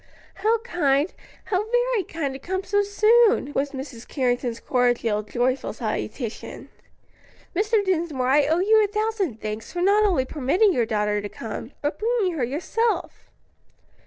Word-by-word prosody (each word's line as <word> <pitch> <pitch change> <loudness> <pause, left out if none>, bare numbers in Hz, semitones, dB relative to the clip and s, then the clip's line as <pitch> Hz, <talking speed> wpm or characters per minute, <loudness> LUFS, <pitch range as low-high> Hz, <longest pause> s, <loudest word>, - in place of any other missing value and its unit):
"How 450 +2 +1
kind, 300 - +1 0.3
how 380 0 0
very 485 -3 +1
kind, 305 -5 -4
to 265 - -7
come 375 +6 -3
so 405 +2 +2
soon!" 425 - +3
was 280 +1 0
Mrs. 265 -4 -8
Carrington's 245 -3 -1
cordial, 240 -4 +1
joyful 245 +5 -1
salutation. 235 -5 -5 0.9
"Mr. 420 +2 +2
Dinsmore, 330 -8 0
I 280 +2 +4
owe 320 +2 +2
you 435 +2 +5
a - - +2
thousand 420 - -2
thanks 215 +1 -5
for 350 - -3
not 410 +3 +4
only 350 -11 +2
permitting 315 - +2
your 235 -6 +1
daughter 210 -1 0
to 205 - -6
come, 225 +4 -7
but 290 +1 -2
bringing 445 -4 +1
her 295 -6 -2
yourself." 360 - -2
310 Hz, 150 wpm, -24 LUFS, 250-415 Hz, 0.9 s, you